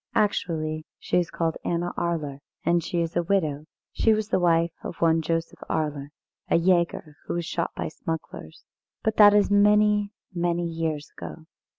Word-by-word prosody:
Actually, 155 -6 0
she - - +1
is 175 - -1
called 165 -1 -1
Anna 175 +1 -1
Arler, 155 -5 -2 0.3
and 170 -1 +2
is 170 -1 -1
a 175 - +3
widow. 160 -5 0 0.3
She 220 -1 +3
was 215 0 -3
the - - +2
wife 170 -1 +3
of - - -6
one 165 -1 +3
Joseph 165 +1 -2
Arler, 150 -3 -1 0.4
a - - +4
jäger, 170 -3 +1
who - - -2
was 175 -1 -2
shot 170 0 -2
by - - -3
smugglers. 155 - -6 0.4
But 220 0 0
that 205 -1 +8
is 205 0 +3
many, 210 0 +4 0.2
many 175 0 0
years 160 -3 -3
ago. 80 -2 -9
170 Hz, 165 wpm, -25 LUFS, 160-185 Hz, 0.4 s, that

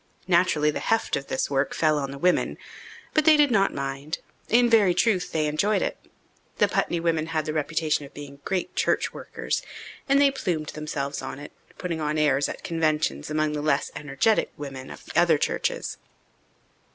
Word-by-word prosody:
Naturally 170 -4 +3
the - - -4
"heft" 225 0 +1
of 140 0 -4
this 130 - -2
work 135 0 0
fell 155 -2 +2
on 140 -1 -3
the 140 - -7
women, 180 +5 +1 0.6
but 310 - +3
they 310 0 +7
did 290 -3 +4
not 195 -3 +3
mind 140 +3 -4 0.3
in 240 +2 +5
very 210 -6 +4
truth, 190 -2 +1
they 155 -1 +1
enjoyed 155 +8 +1
it. - - -2 0.6
The - - +4
Putney 170 - 0
women 165 -2 0
had 160 -2 -1
the 155 - -2
reputation 155 0 0
of 140 - -11
being 140 -1 -9
"great 190 -2 -2
church - - +1
workers," - - -3 0.5
and 275 +1 +5
they 280 -1 +5
plumed 175 - -2
themselves 150 -2 -4
on - - -6
it, 145 +1 -9 0.3
putting 170 -3 -3
on 150 0 -1
airs 145 -2 +2
at - - -7
conventions 160 -2 0
among 155 0 0
the 150 - -2
less 145 -2 +1
energetic 145 +10 +1
women 135 -2 -7
of - - -11
the - - -11
other - - +5
churches. - - -2
155 Hz, 185 wpm, -25 LUFS, 145-180 Hz, 0.6 s, they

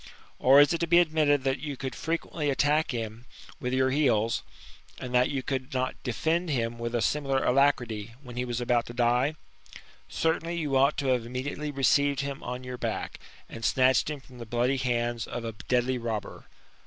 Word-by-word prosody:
Or 135 +2 +7
is 145 +3 +6
it 170 - -1
to 170 - 0
be 170 +1 +5
admitted, 155 -5 +3
that 135 +1 0
you 145 -3 -5
could 130 0 -4
frequently 160 -2 -2
attack 145 +3 +2
him 115 -1 -5 0.3
with 125 - -3
your 130 0 +2
heels, 120 -6 +2 0.6
aj^d 125 - -6
that 125 0 +3
you 135 -2 -2
could 130 +1 -3
not 130 0 0
defend 160 +8 -1
him 115 -4 -1
with 115 +1 -3
a 120 - +1
similar 135 -3 0
alacrity, 125 -5 +1
when 125 -2 -10
he 125 - -1
was 120 -1 -3
about 120 -1 +1
to 120 - -8
die? 125 +5 +2 0.7
Certainly 165 +1 -1
you 150 -5 -1
ought 135 +3 +4
to 140 -2 0
have 125 -2 +2
immediately 140 +4 -4
received 140 +1 +2
him 140 -1 -5
on 125 +1 -5
your 125 -1 -7
back, - - -3 0.3
and 115 - -9
snatched 130 +3 +3
him 150 -2 -4
from 130 -2 -16
the 115 - -7
bloody 120 +4 +1
hands 120 -2 -1
of 120 -1 -5
a 115 - -3 0.2
deadly 125 0 +1
robber. 115 -3 -5
130 Hz, 190 wpm, -28 LUFS, 120-145 Hz, 0.7 s, Or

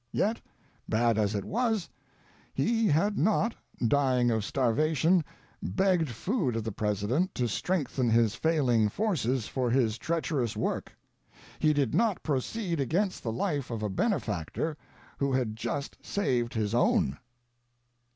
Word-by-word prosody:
Yet, 220 +3 0 0.5
bad 115 0 +2
as 105 0 +1
he 100 - -1
was, 220 - 0 0.7
he 225 -1 +2
had 200 +7 +2
not 215 +6 +2 0.2
— 120 - -1
dying 125 -1 +3
of 110 -2 0
starvation 155 - +2 0.2
— - - -33
begged 170 - +1
food 135 - -1
of 115 - -1
the 110 - -3
President 105 - -1
to 125 - 0
strengthen 135 - 0
his 115 -2 +3
failing 130 -9 +2
forces 130 - 0
for 130 -2 -1
his 115 -2 +1
treacher 160 -3 -1
ous 115 - -3
work; - - -2 0.7
he 155 - +4
did 140 -6 +1
not 225 -5 +1
proceed 165 - -1
against 180 - 0
the 115 - -2
life 145 - -2
of 115 -3 -4
a 105 - 0
benefactor 115 - -1 0.4
who 140 -1 +1
had 125 -4 0
just 120 +5 -4
saved 125 -11 -1
his 110 -1 -1
own. 70 - +2
130 Hz, 145 wpm, -29 LUFS, 115-175 Hz, 0.7 s, he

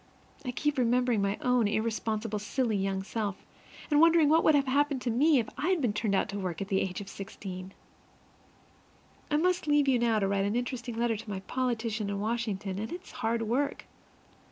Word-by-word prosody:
I 255 - -4
keep 295 +3 -1
remembering 245 -2 +2
my 200 +1 0
own 250 -3 +3
irresponsible 220 0 -1
silly 225 +2 -1
young 195 -1 -1
self, 205 -1 -4 0.5
and 295 0 +5
wondering 330 -2 +6
what 320 +2 +4
would 310 - +5
have 280 -1 +3
happened 280 +1 +1
to 240 - 0
me 290 +6 +4
had 230 -3 -1
I 360 +6 +2
been 250 - 0
turned 210 -1 0
out - - +1
to 200 +1 -4
work 180 -4 -3
at 195 - -4
the 190 - +2
age 185 +1 -3
of 200 - -9
sixteen! 190 -1 -8 1.6
I 295 - +2
must 360 0 +1
leave 295 -1 +3
you 260 -3 +4
now 230 -2 +2
to 200 -2 +1
write 195 0 +1
an 205 +2 -1
interesting 245 -1 -3
letter 230 -1 +1
to 215 +1 -9
my 190 -2 -4
politician 230 -2 -2
in 200 0 -2
Washington, 210 -3 -2
and 220 - -4
it's 355 +2 -8
hard 230 -2 -1
work. 270 +6 -1
230 Hz, 200 wpm, -29 LUFS, 200-265 Hz, 1.6 s, wondering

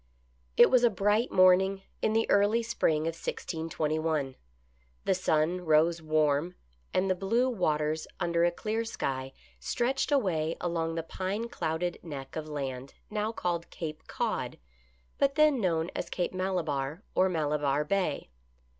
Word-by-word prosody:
It - - +8
was 250 -1 +5
a 240 - +6
bright 210 +4 +1
morning 190 +1 +4 0.2
in 215 - +1
the 225 0 +2
early 205 +3 +3
spring 160 -9 +1
of 165 +1 -1
1621, 155 -4 -2 0.7
The - - +3
sun 175 -1 +1
rose 165 +1 +3
warm, 155 +2 +1 0.4
and 185 +1 +1
the 190 - +3
blue 215 +7 +1
waters 155 -8 0
under 170 0 +1
a 175 - +5
clear 215 +6 -2
sky 135 -11 -3 0.3
stretched 250 - -1
away 165 - +1
along 165 -2 -1
the 165 - -2
pine 195 +7 -3
clouded 170 -2 -2
neck 140 -5 -8
of 155 -1 -4
land 135 -2 -5 0.2
now 210 +1 -1
called 175 -6 -2
Cape 155 -2 -7
Cod, - - -2 0.6
but 275 0 +2
then 305 -5 +4
known 165 -2 0
as - - -3
Cape 180 0 -2
Mala 185 -1 -1
barre, 145 +4 -3
or 190 +1 +3
Malabarre 150 -3 0
Bay. 185 - -1
170 Hz, 145 wpm, -29 LUFS, 155-200 Hz, 0.7 s, It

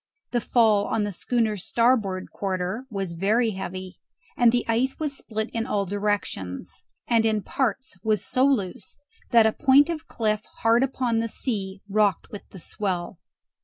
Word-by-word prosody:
The 240 - +1
fall 215 -3 +3
on 225 - 0
the 205 - -2
schooner's 215 0 -1
starboard 225 -6 +1
quarter 190 +5 -3
was 195 -5 -3
very 215 +7 +2
heavy, 185 -1 -6 0.4
and 240 -2 +5
the 240 0 0
ice 240 +4 +1
was 300 -3 -2
split 220 -3 -4
in 230 +1 -2
all 205 -5 0
directions; 200 - -3 0.2
and 230 -2 +3
in 215 -2 +1
parts 260 -3 -2
was 215 -1 +1
so 255 - +1
loose 230 -6 0 0.3
that 230 -2 +6
a 220 - +3
point 285 +2 +5
of 320 -1 -6
cliff 215 -2 -1 0.2
hard 230 +1 +5
upon 255 -3 0
the 230 - 0
sea 195 -6 -3
rocked 205 -2 +1
with 205 - -9
the 190 - -11
swell. 180 -1 -3
220 Hz, 165 wpm, -25 LUFS, 195-240 Hz, 0.4 s, that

